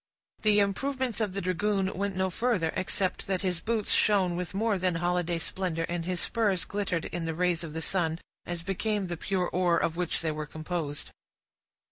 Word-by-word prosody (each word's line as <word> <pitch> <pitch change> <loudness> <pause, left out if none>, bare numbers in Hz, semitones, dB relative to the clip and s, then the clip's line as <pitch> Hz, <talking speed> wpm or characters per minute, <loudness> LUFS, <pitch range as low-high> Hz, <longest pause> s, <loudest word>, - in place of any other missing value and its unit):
The 210 -1 +5
improvements 250 +3 0
of 205 -4 0
the 195 - -2
dragoon 190 +2 +1
went 200 0 -1
no 190 0 +1
further, 195 -6 +1
excepting 185 0 -1
that 190 0 0
his 180 -3 0
boots 220 +1 +1
shone 190 -4 +4
with 180 +1 -4
more 215 -1 +2
than 180 -1 +1
holiday 175 0 +1
splendor, 165 -1 -2
and 170 0 -2
his 180 0 -1
spurs 200 -6 +1
glittered 195 -5 -1
in 170 -1 -3
the 160 -1 -2
rays 175 -1 +1
of 160 -2 -6
the 160 0 -3
sun, 165 -4 +1 0.3
as 175 -1 -3
became 200 +2 0
the 175 -1 -3
pure 185 +1 0
ore 175 -2 +2
of 165 0 0
which 180 -2 0
they 160 - +1
were 155 0 -4
composed. 155 -1 -3
180 Hz, 190 wpm, -29 LUFS, 170-200 Hz, 0.3 s, The